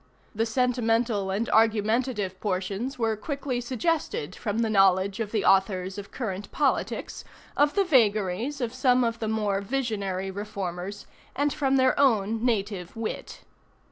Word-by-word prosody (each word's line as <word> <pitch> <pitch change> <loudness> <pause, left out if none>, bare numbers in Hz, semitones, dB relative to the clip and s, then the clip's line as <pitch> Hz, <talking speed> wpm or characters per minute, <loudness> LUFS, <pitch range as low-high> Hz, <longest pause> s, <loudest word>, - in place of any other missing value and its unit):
The 225 +1 0
sentimental 230 -4 +1
and 205 +5 -1
argumentative 220 -2 +1
portions 200 +6 -2
were 225 -2 +1
quickly 265 +2 -3
suggested 255 - -2
from 210 -1 -3
the 230 -1 +1
knowledge 195 0 +3
of 215 -2 -3
the 215 -3 0
authors 190 0 +2
of 200 - -9
current 205 -5 -5
politics, 285 -3 -1 0.3
of 290 0 +3
the 400 - +4
vagaries 230 - +2
of 235 -1 -2
some 255 -1 +3
of 230 -1 -1
the 220 - -2
more 210 -3 0
visionary 200 -5 -2
reformers, 195 -1 -5 0.3
and 285 +1 +1
from 270 -2 +1
their 260 0 +3
own 225 -4 +2
native 200 -6 -1
wit. 225 -1 -5
220 Hz, 140 wpm, -26 LUFS, 195-250 Hz, 0.3 s, the